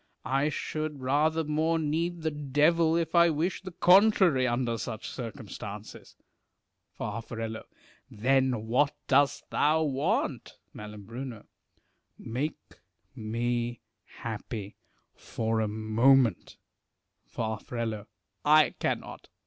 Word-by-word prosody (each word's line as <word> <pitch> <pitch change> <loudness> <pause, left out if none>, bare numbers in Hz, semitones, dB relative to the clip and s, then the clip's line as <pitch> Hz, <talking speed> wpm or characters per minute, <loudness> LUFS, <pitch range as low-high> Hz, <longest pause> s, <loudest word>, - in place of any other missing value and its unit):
I 135 +3 +1
should 155 -1 -4
rather 155 +5 +2
more 155 +2 +1
need 165 +2 -1
the 160 - 0
devil, 150 +3 +2
if 165 -1 -1
I 170 -1 +6
wished 165 +5 -1
the 185 - -5
contrary, 180 -6 +5
under 120 -1 -1
such 110 +1 -5
circumstances. 105 -3 -8 0.8
Far. 115 - -4 0.9
Then 125 0 +1
what 135 +6 +2
dost 140 +1 +3
thou 155 +2 +3
want? 140 -2 -1 0.2
Mai. 105 0 -8 1.3
Make 130 +7 -5 0.4
me 120 +2 -2 0.4
happy 110 -2 -5 0.4
for 110 0 -2
a 110 - 0
moment.. 110 +1 +2 0.7
Far. 110 -2 -3 0.8
I 155 +1 +6
cannot. - - -3
135 Hz, 95 wpm, -29 LUFS, 115-155 Hz, 1.3 s, I